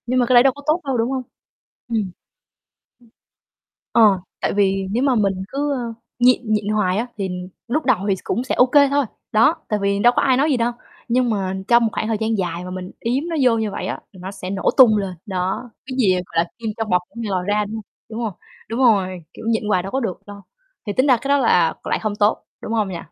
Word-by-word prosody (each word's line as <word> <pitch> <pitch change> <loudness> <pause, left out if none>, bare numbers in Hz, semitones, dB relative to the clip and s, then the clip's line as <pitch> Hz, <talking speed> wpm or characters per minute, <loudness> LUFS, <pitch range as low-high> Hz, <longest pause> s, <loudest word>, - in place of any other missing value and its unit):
Nhưng 255 +1 +1
mà 245 - +3
cái 255 - +1
đấy 240 0 +8
đâu 270 -1 +4
có 285 - -12
tốt 310 +4 +2
đâu, 265 -2 0
đúng 230 +3 0
hông? 260 -1 -2 0.7
Ừm. 230 - 0
Ừm. 200 -4 -2 1.8
Ờ, 210 -5 +5 0.2
tại - - 0
vì 195 -1 +1
nếu 235 +5 0
mà 270 -2 +3
mình 195 -4 0
cứ, 285 +3 -1
ơ, 240 -4 -3 0.2
nhịn 250 +1 +5
nhịn 210 -1 -1
hoài 210 -3 +1
á, 235 - -1
thì 195 -1 -2 0.4
lúc 300 +6 0
đầu 255 -6 +3
thì 195 - +2
s - - -12
cũng 240 - -1
sẽ 260 - -1
ô 250 - +5
kê 280 +2 +5
thôi, 285 0 +2 0.3
đó, 225 +9 +5
tại 210 - 0
vì 200 0 +1
đâu 240 +3 +5
có - - +3
ai 260 -2 +3
nói 290 +4 +2
gì 270 - +3
đâu. 235 0 0 0.4
Nhưng 245 0 +2
mà 190 -3 -1
trong 235 0 +5
một 225 - +1
khoảng - - -2
thời 220 -2 0
gian 220 -1 0
dài 175 -1 -3
mà 180 - -7
mình 185 0 -6
yếm 250 +6 -1
nó 330 - -2
vô 240 -3 +4
như 220 -1 -1
vậy - - -5
á, - - -4
thì 190 - -15
nó 185 +1 -6
sẽ 185 -2 -7
nổ 195 0 +1
tung 235 -5 +7
lên. 195 -2 -3
Đó, 190 +5 -3 0.2
cái 260 - -5
gì, 205 -7 +4
ờ, - - 0
gọi 165 -1 0
là, 170 - -18
kim 225 -2 -3
trong 225 -1 -2
bọc 180 -1 +3
có - - -30
ngày 225 -3 -3
lòi 185 -2 -1
ra, 210 +1 +2
đúng 210 - -7
hông, 220 - -6 0.3
đúng 220 - -6
hông? 225 -3 -2 0.4
Đúng 230 +3 -3
rồi, 190 -8 +2
kiểu, - - -10
nhịn 225 -1 +1
quài 185 -4 +2
đâu 195 - -7
có 265 - 0
được 205 -8 -3
đâu. 205 0 -10 0.4
Thì 205 - -1
tính 255 +6 +2
ra 260 -3 +5
cái 275 - -5
đó 285 0 +4
là 175 -10 +3
lại - - 0
hông 215 -2 -2
tốt, 210 +1 +1 0.2
đúng - - -5
hông 215 -3 +1
nhỉ? 185 - -5
220 Hz, 265 wpm, -21 LUFS, 195-250 Hz, 1.8 s, đấy